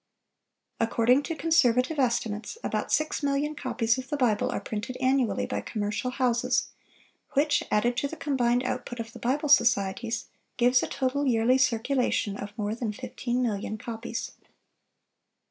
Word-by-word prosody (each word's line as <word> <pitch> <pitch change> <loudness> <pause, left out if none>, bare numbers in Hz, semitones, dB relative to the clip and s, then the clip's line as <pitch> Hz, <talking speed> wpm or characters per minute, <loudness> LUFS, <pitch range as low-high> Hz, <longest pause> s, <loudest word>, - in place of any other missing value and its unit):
According 230 +3 +3
to 325 +3 -4
conservative 285 -2 +2
estimates, 235 - -1
about - - -2
six 310 0 +1
million 285 +1 0
copies 255 -4 0
of 260 - -8
the 295 - -1
Bible 230 -6 +2
are - - -2
printed 220 +4 -5
annually 260 -2 +1
by - - -3
commercial 210 +3 -2
houses, 250 -2 +1 0.6
which, 290 +1 +3
added 240 +3 +1
to 280 - 0
the 320 - -7
combined 250 -5 +1
output 250 -1 -4
of 225 0 -6
the - - -10
Bible 280 +5 0
societies, 230 -3 +2 0.3
gives 245 +1 +4
a - - -2
total 275 +2 -1
yearly 245 +2 +3
circulation 245 -4 +1
of 205 0 -6
more 210 -1 -1
than 230 -1 -3
fifteen 245 +4 -3
million 215 -2 -2
copies. 230 +1 -5
245 Hz, 145 wpm, -27 LUFS, 225-275 Hz, 0.6 s, gives